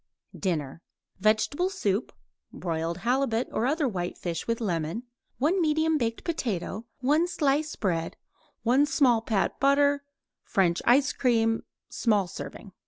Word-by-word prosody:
DINNER 165 -5 -2 0.4
Vegetable 220 - +2
soup; 215 - -1 0.4
broiled 165 -1 -3
halibut 245 -1 +1
or 235 - 0
other 295 +1 +1
white 180 -6 -3
fish 170 -2 -4
with 230 0 0
lemon; 175 0 -2 0.3
1 335 +8 +2
medium 315 0 +2
baked 230 -2 -2
potato; 225 - -3
1 300 +6 +3
slice 300 -3 0
bread; 170 -6 -2 0.5
1 260 +5 +4
small 255 -7 +3
pat 215 -3 -1
butter; 285 +1 +3 0.4
French 175 -3 +1
ice 265 +2 +5
cream 225 -3 +2 0.3
(small 210 -5 +1
serving). 190 +3 -8
235 Hz, 125 wpm, -27 LUFS, 195-285 Hz, 0.5 s, ice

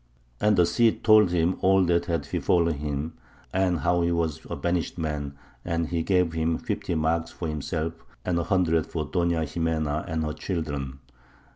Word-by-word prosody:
And 105 -1 +3
the 90 - +6
Cid 115 +5 +2
told 110 -3 +6
him 85 +1 +1
all 95 0 +5
that 85 -1 +2
had 80 -4 -2
befallen 85 -4 +2
him, 75 +1 -3 0.4
and 95 -2 +1
how 85 0 +2
he 85 0 +1
was 80 -3 -1
a - - -3
banished 85 +4 -1
man; 75 -4 -3 0.3
and 85 -1 -1
he 85 -2 0
gave 90 -1 +2
him 80 0 0
fifty 85 - -3
marks 80 +1 0
for 85 - -5
himself, 75 +2 -2 0.3
and 90 -2 +1
a - - 0
hundred 85 -4 +2
for 80 -2 -3
Doña 85 -1 +1
Ximena 80 -1 -1
and 80 -1 -1
her 75 0 -2
children. 75 -8 -4
85 Hz, 175 wpm, -26 LUFS, 80-90 Hz, 0.4 s, the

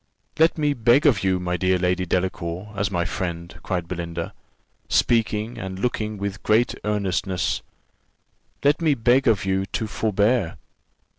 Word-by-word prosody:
"Let 160 +1 +4
me 150 -2 +2
beg 120 +3 +3
of 120 -10 +4
you, 95 -1 +2
my 90 0 -2
dear 95 +1 +2
Lady 90 0 0
Delacour, 90 +2 -2
as 100 0 0
my 90 -3 -1
friend," 85 -1 -4
cried 90 -3 -3
Belinda, 85 -1 -4 0.6
speaking 115 0 +1
and 95 -3 -5
looking 110 -1 -2
with 100 0 -4
great 115 +3 +3
earnestness; 95 -3 -1 1.0
"let 145 +4 +3
me 155 -3 +3
beg 125 +2 +3
of 110 -5 +3
you 95 0 0
to 110 - -2
forbear. 105 -3 +1
100 Hz, 145 wpm, -23 LUFS, 90-115 Hz, 1.0 s, Let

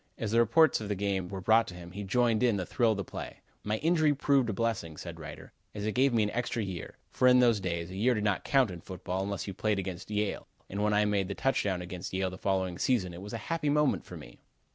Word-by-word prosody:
As 110 - -3
the 115 - +4
reports 120 +5 +4
of 105 - -5
the 105 - 0
game 95 -2 -1
were 95 0 -5
brought 110 +4 +4
to 90 - -8
him, 85 0 -10
he 100 +3 -6
joined 115 +3 +2
in 120 -5 +3
the 90 - -2
thrill 115 +4 +2
of 110 - +1
the 100 - -2
play. - - -7 0.3
"My 105 +1 -1
injury 155 +1 +2
proved 135 -3 +2
a - - +1
blessing," 100 -8 -2
says - - -7
Reiter, - - -10 0.2
"as 105 0 -4
it 110 - 0
gave 130 +4 +3
me 115 -2 +3
an 105 - -1
extra 120 -1 -2
year, 95 -4 -6
for 125 - +3
in 125 0 +7
those 120 -4 +4
days 85 -2 -3
a - - -7
year 120 +5 +2
did 105 - -2
not 100 -3 0
count 135 -7 +3
in 85 -2 -8
football, 95 +1 -4
unless 100 0 -3
you 100 - -5
played 105 +1 0
against 95 -1 -5
Yale, 105 -1 -2 0.2
and 100 +2 -2
when 105 0 +2
I 105 0 +4
made 100 -2 +1
the 100 - -4
touchdown 100 -9 0
against 90 0 -7
Yale 95 0 0
the 95 - -9
following 95 -2 -1
season, 100 -9 +1
it 85 - -9
was 105 +3 -8
a - - -2
happy 165 -3 0
moment 150 0 +2
for - - -10
me." - - -13
105 Hz, 270 wpm, -30 LUFS, 95-120 Hz, 0.3 s, in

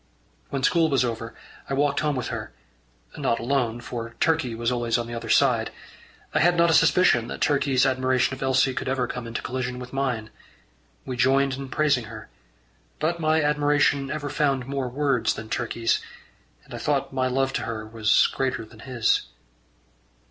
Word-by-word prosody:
When 135 -1 -3
school 165 +2 +3
was 135 -3 +2
over, 115 -1 -5 0.3
I 135 - 0
walked 145 0 +1
home 150 -2 0
with 125 - -3
her - - -5 0.7
not 115 - +1
alone, 120 -1 -1
for 115 -1 -6
Turkey 155 -8 +1
was 115 +1 -1
always 120 -1 0
on 120 - -2
the 120 - -7
other 115 - -6
side. - - +3 0.6
I - - +2
had 175 +3 +4
not 170 0 +4
a - - +3
suspicion 160 -7 +4
that - - -6
Turkey's 140 -3 +2
admiration 130 -1 +1
of 130 - -8
Elsie 130 0 +2
could 130 - -3
ever 130 -2 0
come 125 -1 -6
into 115 - -5
collision 125 0 -3
with 125 0 -9
mine. 125 -5 -2 0.7
We 125 - -5
joined 135 +2 +3
in 135 0 -6
praising 140 -4 +1
her, - - -10 0.7
but 170 +2 -1
my 155 -1 +2
admiration 145 -2 +2
ever 145 -1 -4
found 140 -3 0
more 135 -1 -3
words 135 -2 +1
than 110 0 -8
Turkey's, 115 -1 0 0.6
and - - -13
I - - -5
thought - - -1
my 130 -1 +1
love 135 +1 0
to - - -1
her 110 -2 -4
was 110 0 +3
greater 130 -4 -2
than 110 0 -17
his. 120 - 0
130 Hz, 180 wpm, -25 LUFS, 120-140 Hz, 0.7 s, had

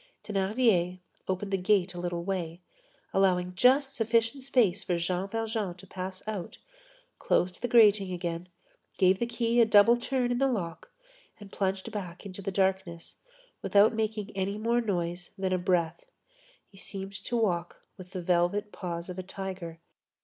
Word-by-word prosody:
Thénardier 195 -3 +1 0.3
opened 190 +1 -2
the - - +3
gate 185 -1 +2
a 175 - -7
little 175 -1 -3
way, 175 -3 -3 0.5
allowing 180 -2 +2
just 265 +8 +4
sufficient 230 +2 +1
space 235 -8 +2
for 175 - 0
Jean 180 +2 -1
Valjean 220 -3 -2
to 185 - -14
pass 185 +1 -7
out, 205 -5 -5 0.6
closed 180 0 0
the 245 - 0
grating 210 -5 +5
again, 175 0 -4 0.5
gave 185 0 +4
the 235 - 0
key 235 0 +2
a - - +7
double 220 +2 +6
turn 245 0 -1
in 245 - 0
the 270 - +3
lock 180 -10 -3 0.5
and 205 -2 -12
plunged 195 +2 -2
back 185 -3 -6
into 195 0 -7
the 195 - -3
darkness, 190 -3 -1 0.4
without 205 +2 +4
making 215 -1 -2
any 195 +1 -1
more 235 +2 +1
noise 175 -4 -3
than 190 -1 -1
a 185 - +1
breath. 170 -2 0 0.6
He 195 - -17
seemed 195 0 -7
to 240 - -1
walk 175 -6 -1
with 185 -2 -11
the 185 -1 -6
velvet 180 +4 +1
paws 170 -2 -5
of 180 0 -6
a - - -4
tiger. 185 -3 -6
195 Hz, 165 wpm, -29 LUFS, 180-220 Hz, 0.6 s, a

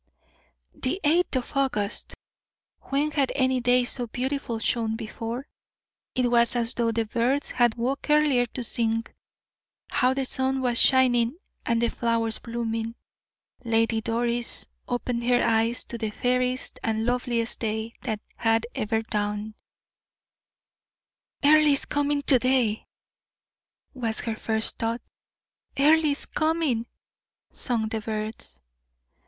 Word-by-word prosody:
The 260 +9 -2
eighth 330 +1 +2
of 255 +2 -3
August! 245 -7 -1 0.7
When 285 +3 0
had 280 -3 +1
any 260 -1 +2
day 245 +1 +3
so 245 0 -3
beautiful 255 0 -3
shone 225 0 0
before? 230 +3 -5 0.7
It 250 -2 +1
was 235 0 +5
as 235 0 0
though 230 -1 0
the 225 0 -1
birds 245 +6 0
had 240 -2 +2
woke 260 +5 -3
earlier 295 -5 +3
to 245 +2 -6
sing. 225 -1 +5 0.9
How 255 +1 +2
the 270 -1 -1
sun 265 +1 0
was 245 -2 +3
shining 250 0 +3 0.3
and 230 -1 +2
the 235 0 +2
flowers 230 -1 0
blooming! 230 -1 -4 0.7
Lady 225 -1 +1
Doris 235 +1 -1 0.2
opened 245 -1 -2
her 245 0 +3
eyes 230 +1 +1
to 235 - -7
the 220 - -2
fairest 250 +3 -1
and 220 0 -1
loveliest 245 -1 -1
day 220 0 -3
that 220 -4 -3 0.2
had 225 0 +1
ever 220 +1 -1
dawned. 210 0 -3 1.9
"Earle 305 +1 +6
is 280 -2 +3
coming 290 0 0
to 260 -3 +6
day!" 250 -4 +1 1.1
was 230 -5 -2
her 225 -2 -3
first 220 0 -1
thought. 230 +1 -2 0.8
"Earle 310 +3 +5
is 285 -1 0
coming!" 310 -7 0 0.7
sung 230 -3 -1
the 220 0 -3
birds. 215 - -5
240 Hz, 125 wpm, -25 LUFS, 225-260 Hz, 1.9 s, Earle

